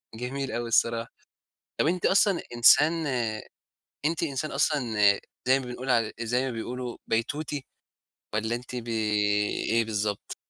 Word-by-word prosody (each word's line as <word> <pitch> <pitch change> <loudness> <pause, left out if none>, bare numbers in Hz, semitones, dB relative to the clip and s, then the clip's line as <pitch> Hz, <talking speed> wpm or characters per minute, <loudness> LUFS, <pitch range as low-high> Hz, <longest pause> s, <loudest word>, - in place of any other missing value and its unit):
جميل 130 +3 -4
أوي 120 0 -3
الصراحة. 115 0 +1 0.7
طب - - +2
أنتِ 180 +2 +1
أصلًا 195 -1 +3
إنسان 145 +6 +6 1.1
أنتِ 160 +2 0
إنسان 150 -1 -2
أصلًا 125 -8 0 0.5
زي 130 +1 +5
ما - - -7
بنقول 125 +2 -5
عل 115 -3 +2
زي 125 +3 0
ما - - -2
بيقولوا 120 +1 -5
بيتوتي، 140 +5 -2 0.7
والّا 110 +2 0
أنتِ 125 +1 -8
ب 120 -1 -5
إيه 105 +1 +1
بالضبط؟ 105 -2 -3
120 Hz, 130 wpm, -27 LUFS, 115-135 Hz, 1.1 s, إنسان